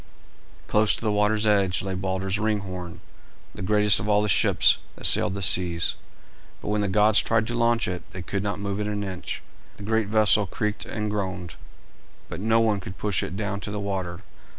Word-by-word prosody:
Close 105 0 +2
to - - -9
the 110 - +1
water's 105 +1 +1
edge 100 -3 +2
lay 95 -1 -3
Balder's 95 +2 -2
Ringhorn, 95 -5 -3 0.5
the - - -9
greatest 105 +1 +3
of 100 +2 -4
all 105 0 +3
the - - 0
ships - - +4 0.2
that - - -9
sailed 95 - +5
the 100 - -4
seas, 85 -2 +3 0.7
but - - -6
when 105 0 0
the 100 - 0
gods 105 +2 +4
tried 110 -1 +1
to 120 - -4
launch 115 0 +1
it 90 -1 -4
they 95 - -8
could 100 +3 -3
not 100 -2 -3
move 100 0 -3
it 105 - -2
an 105 -1 -3
inch. 95 -2 -5 0.3
The - - -10
great 110 0 0
vessel 105 -1 +3
creaked 105 +2 -3
and 105 -1 -3
groaned, 95 -5 -4 0.7
but 85 - -6
no 110 +3 +2
one 110 -3 +1
could 90 -1 -9
push 105 -3 0
it 90 - -5
down 100 -1 -3
to 100 - -6
the 105 0 -4
water. 95 -2 -4
100 Hz, 200 wpm, -25 LUFS, 95-105 Hz, 0.7 s, sailed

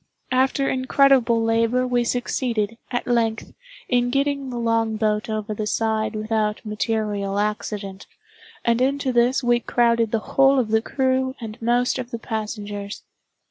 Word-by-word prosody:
After 265 +2 +2
incredible 260 -3 +3
labor 230 +2 +2
we 245 -1 +1
succeeded, 235 -2 -1
at 245 -1 -2
length, 230 -2 0 0.3
in 245 -1 +2
getting 275 +1 0
the 245 - -5
longboat 220 -2 0
over 215 -1 -3
the 210 0 -3
side 220 0 0
without 215 0 -1
material 210 -2 -2
accident, 205 -2 -3 0.6
and 235 +1 +2
into 270 0 +1
this 245 +3 +2
we 240 0 +3
crowded 235 -2 +1
the 225 - +2
whole 270 +5 +3
of 240 -4 +1
the 220 0 +3
crew 260 +1 0
and 225 -1 -8
most 245 +3 +1
of 250 -1 -5
the 235 - -4
passengers. 210 -3 -5
230 Hz, 140 wpm, -23 LUFS, 215-250 Hz, 0.6 s, incredible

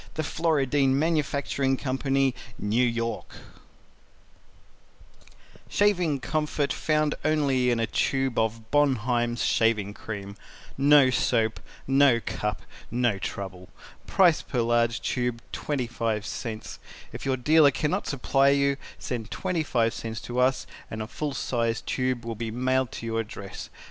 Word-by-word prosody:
The 155 - -1
Floridine 145 -4 +1
Manufacturing 140 -3 0
Co. 130 -1 -2 0.6
NEW 110 +5 +1
YORK 115 -1 -2 2.3
Shaving 180 -8 +2
Comfort 150 +1 -1
Found 155 -1 +1
only 140 -5 +2
in 120 -1 +1
a 115 - +2
tube 135 +1 0
of 110 0 -2
Bonheim's 120 -4 +1
Shaving 110 -3 +2
Cream 100 -2 -7 0.4
NO 140 -1 +6
SOAP 115 -3 +1 0.3
NO 135 -3 +5
CUP 105 -2 -3 0.3
NO 120 -4 +1
TROUBLE 95 0 -6 0.4
PRICE 175 -5 +4
PER 125 - -2
LARGE 115 0 +2
TUBE 125 -2 -1
25 115 -6 -2
CENTS 110 0 -6 0.3
IF - - -7
YOUR 130 -1 +1
DEALER 150 +3 +5
CANNOT 150 +8 -1
SUPPLY 135 +1 +3
YOU 140 0 +2 0.2
SEND 115 -3 -5
25 150 -11 0
CENTS 110 -1 -5
TO 120 +2 -4
US 130 +1 +2 0.2
AND 110 0 -4
A - - -7
FULL 145 +3 -4
SIZE 115 -3 -1
TUBE 130 -2 -2
WILL 115 - -3
BE 115 +1 -4
MAILED 130 +2 0
TO - - -7
YOUR 115 0 -1
ADDRESS. 100 -3 -7
125 Hz, 130 wpm, -26 LUFS, 115-140 Hz, 2.3 s, NO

